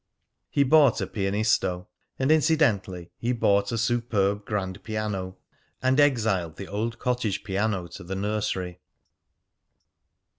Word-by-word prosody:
He 140 - +3
bought 140 -2 +5
a - - -1
"Pianisto," 95 -3 0 0.3
and 135 +3 +1
incidentally 120 - +2
he 120 +2 0
bought 100 -3 +2
a 115 - -1
superb 105 -3 0
grand 100 -2 -3
piano, 105 -4 -3 0.4
and 130 +2 +2
exiled 110 - +2
the - - -8
old 110 +5 -3
cottage 115 -6 -1
piano 100 -1 -1
to 95 - -10
the 95 +3 -5
nursery. 95 -3 -2
105 Hz, 120 wpm, -26 LUFS, 95-120 Hz, 0.4 s, bought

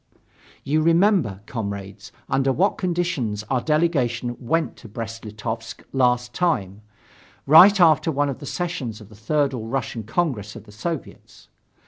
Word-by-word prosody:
You 150 +3 +1
remember, 165 - +3
comrades, 100 -2 -6 0.2
under 135 0 +1
what 185 +9 +1
conditions 170 - -1
our 130 -2 +2
delegation 130 -7 0
went 160 +7 -1
to 115 - -12
Brest 115 +1 -6
Litovsk 110 +2 -6
last 125 -2 +1
time, 105 - -1 0.6
right 185 +8 +8
after 160 -2 +4
one 145 0 +1
of 140 - -4
the 145 - -8
sessions 135 -12 -4
of 105 -2 -14
the 110 - -15
Third 140 +6 0
All 110 -3 -5
Russian 120 -2 -3
Congress 110 - -2
of 115 - -10
the 105 - -16
Soviets. 150 +9 -7
125 Hz, 145 wpm, -23 LUFS, 110-160 Hz, 0.6 s, right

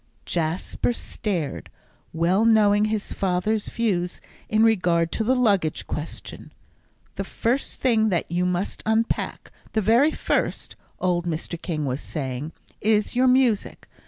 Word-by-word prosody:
Jasper 170 +8 -1
stared, 180 - -4 0.4
well 175 +6 +2
knowing 210 -2 +5
his 215 -1 -2
father's 195 +3 0
views 185 -7 -1 0.3
in 215 +1 +3
regard 180 -7 +3
to 220 - -1
the 255 +4 +2
luggage 200 - +1
question. 150 +1 -6 0.7
"The - - -1
first 250 +4 -1
thing 225 -4 +2
that 175 -4 0
you 175 +2 0
must 180 +2 -1
unpack 220 +1 -1 0.2
the 220 - +2
very 230 +9 +4
first," - - -1 0.2
old 175 -1 0
Mr. 165 +1 -3
King 155 -5 -2
was 130 +1 -2
saying, 135 0 -4 0.3
"is 215 +1 +2
your 255 +1 +4
music. 250 -5 +2
200 Hz, 130 wpm, -24 LUFS, 170-220 Hz, 0.7 s, knowing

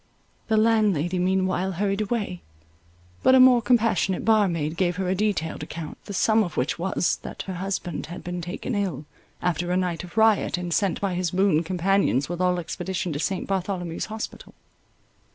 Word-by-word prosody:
The 220 - +2
landlady 205 -6 +2
meanwhile 185 0 +1
hurried 195 +3 -1
away; 205 -5 -2 0.8
but 260 - +6
a - - +7
more 255 -2 +7
compassionate 230 -5 +2
bar 215 -2 +4
maid 160 -3 -2
gave 175 -1 +1
her 185 +1 -2
a - - +2
detailed 190 -5 -1
account, 160 -2 -7
the 200 - -7
sum 220 +3 +3
of 175 - -6
which 130 +6 -1
was, 180 0 0
that - - -7
her 190 - -5
husband 185 -2 -4
had 175 - -8
been 175 0 -4
taken 175 +8 -5
ill, 185 -9 -2 0.4
after 175 0 0
a 180 - +2
night 180 -2 -1
of 180 +3 -12
riot, 220 -4 +3
and 175 -1 -3
sent 195 -3 +1
by 195 -2 -1
his 180 0 -1
boon 180 -3 +2
companions 180 -6 +1
with 175 +1 -4
all 180 0 +2
expedition 185 +1 -3
to 145 - -3
St. 190 +4 -1
Bartholomew's 185 -3 -2
Hospital. 220 0 -7
185 Hz, 180 wpm, -25 LUFS, 175-205 Hz, 0.8 s, a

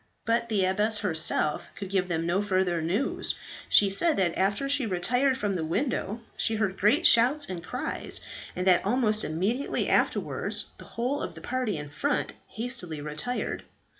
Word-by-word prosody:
But 230 +1 0
the 200 -4 +1
abbess 210 +4 +3
herself 160 -6 +2
could 195 -2 -7
give 190 -2 +1
them 165 -2 -2
no 175 +4 +1
further 185 -4 0
news. 190 +12 -1 0.3
She 200 -2 +5
said 320 - +2
that 180 -3 +1
after 200 +8 0
she 275 -3 +1
retired 245 +9 +1
from 205 -5 -2
the 165 - -2
window, 220 - -2
she 225 - +3
heard 210 -3 -2
great 250 - +3
shouts 255 +6 +5
and 175 -3 -6
cries, - - -1 0.4
and 180 - -3
that 180 -2 +5
almost 215 0 +1
immediately 195 - -1
afterwards - - 0
the - - -11
whole 250 +5 -2
of - - -5
the - - -10
party 250 -7 -2
in 150 -1 -7
front 285 - -1
hastily 220 - -3
retired. 155 +12 -4
205 Hz, 165 wpm, -27 LUFS, 180-245 Hz, 0.4 s, She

